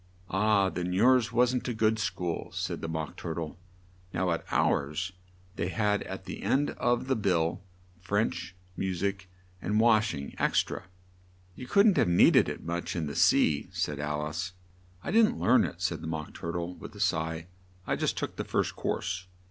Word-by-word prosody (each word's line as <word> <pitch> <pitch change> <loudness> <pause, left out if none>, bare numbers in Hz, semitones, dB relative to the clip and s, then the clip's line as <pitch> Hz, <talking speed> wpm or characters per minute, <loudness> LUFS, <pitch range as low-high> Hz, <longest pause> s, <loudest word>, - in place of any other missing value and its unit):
"Ah! 100 0 +3
then 90 0 -2
yours 120 +4 +4
wasn't 125 +1 +2
a 120 - -2
good 110 0 +2
school," 90 -5 -2
said - - -3
the - - -3
Mock 80 -2 -4
Tur 80 - -5
tle. 80 0 -5 0.6
"Now 90 0 +1
at 85 - -1
ours 75 +7 +1 0.5
they 85 - -1
had 105 +1 +1
at 95 0 -7
the 95 - -6
end 145 +2 +1
of 120 0 0
the 130 0 +1
bill, 90 -4 +1 0.4
'French, 95 -2 -1 0.2
mu 95 -1 -2
sic, 95 +1 -2 0.3
and 105 +1 +1
wash 110 -6 +4
ing 70 -1 -6
ex - - +3
tra.'" - - -7 0.7
"You 125 - -9
couldn't 200 - +5
have - - +4
need 85 - +6
ed - - +5
it - - -6
much 85 +1 -3
in 85 -3 -1
the 70 - -5
sea," 75 -2 +3
said 75 -1 -2
Al 75 +1 -2
ice. 85 +4 -4 0.5
"I - - -3
didn't 220 +1 +4
learn 130 - +4
it," 90 +1 -4
said 85 -3 -1
the 80 - -6
Mock 80 -2 -4
Tur 85 - -5
tle, 85 +1 -3
with - - -11
a - - -10
sigh. 80 -4 0 0.4
"I - - 0
just - - -1
took - - -3
the - - -2
first - - -1
course." 90 +1 -2
90 Hz, 190 wpm, -29 LUFS, 85-110 Hz, 0.7 s, need